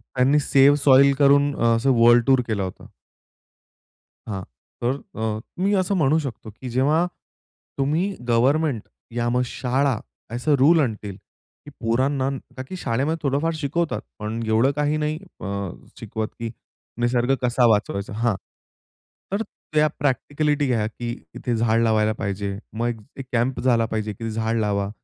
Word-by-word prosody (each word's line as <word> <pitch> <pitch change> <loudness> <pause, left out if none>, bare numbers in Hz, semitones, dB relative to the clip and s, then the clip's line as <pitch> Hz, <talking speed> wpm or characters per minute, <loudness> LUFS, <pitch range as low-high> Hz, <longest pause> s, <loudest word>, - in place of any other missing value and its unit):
त्यांनी 135 +3 +4
save 140 0 +5
soil 140 0 +7
करून 140 0 +4 0.2
असं 135 +4 +2
वर्ल्ड 120 0 +6
टूर 130 -2 +5
केला 105 -3 -1
होता. 95 - -7 1.4
हां. 100 -2 -3 0.4
तर 125 +3 +1 0.2
अ, 110 -1 -1 0.2
मी 200 +2 +2
असं 185 +2 -1
म्हणू 155 -3 +3
शकतो 130 -7 -6
की 130 - -5
जेव्हा 145 +7 +2 0.7
तुम्ही 160 +9 0
गव्हर्नमेंट 130 +2 +2 0.3
या 120 0 0
मग 125 +1 +2
शाळा 130 0 0 0.3
असे 135 +5 +2
रूल 155 +6 +5
आणतील, 110 -7 -2 0.5
की - - -9
पोरांना 130 +4 +1 0.3
ताकि 130 +8 -6
शाळेमध्ये 140 0 -1
थोडंफार 145 +4 +1
शिकवतात. 155 +2 -1 0.2
पण 110 +2 -4
एवढं 115 +5 +3
काही 150 +1 +1
नाही 155 +1 -1 0.2
अ, - - -7 0.5
शिकवत 110 -1 -3
की 115 -1 -3 0.5
निसर्ग 120 +2 +2
कसा 125 0 +3
वाचवायचा? 105 -2 0
हां. 115 0 +1 1.0
तर 200 +2 0 0.3
त्या 155 0 +5
प्रॅक्टिकलिटी 145 +2 0
घ्या 115 -4 +1
की 120 +2 -6 0.3
इथे 120 - -2
झाड 115 0 +2
लावायला 110 -1 +2
पाहिजे. 100 -1 -3 0.2
मग 115 0 -2 0.2
एक 135 - -6
कॅम्प 125 +2 0
झाला 120 -2 +3
पाहिजे 110 -1 -3
की 115 +1 -5
झाड 110 +1 -1
लावा. 100 -2 0
125 Hz, 145 wpm, -23 LUFS, 115-145 Hz, 1.4 s, soil